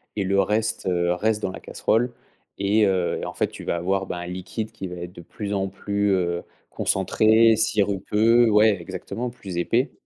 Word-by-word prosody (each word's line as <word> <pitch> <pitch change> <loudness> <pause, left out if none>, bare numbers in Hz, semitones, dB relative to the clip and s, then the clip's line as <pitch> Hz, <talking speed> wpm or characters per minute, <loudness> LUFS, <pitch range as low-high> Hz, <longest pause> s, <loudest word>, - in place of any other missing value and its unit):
et 100 - 0
le 100 +1 +1
reste, 110 +2 0
heu, 85 -1 +1
reste 110 +3 0
dans 95 - -2
la - - -8
casserole 120 +2 0 0.4
et 105 +2 +3
heu, 95 -3 0
en - - -5
fait - - 0
tu - - -10
vas - - 0
avoir 95 +3 -1
bah, - - -5
un 90 - -6
liquide 95 +5 -5
qui 95 -4 -7
va 90 - -7
être 85 0 -7
de 85 - -11
plus 100 +4 -6
en 95 -1 0
plus, 100 +1 -1
heu, 85 -1 0 0.3
concentré, 110 +4 +3
sirupeux 110 +2 +3
ouais 105 -3 +4
exactement, 95 +7 -5
plus 100 -7 -8
épais. 115 - +1
100 Hz, 190 wpm, -24 LUFS, 90-110 Hz, 0.4 s, ouais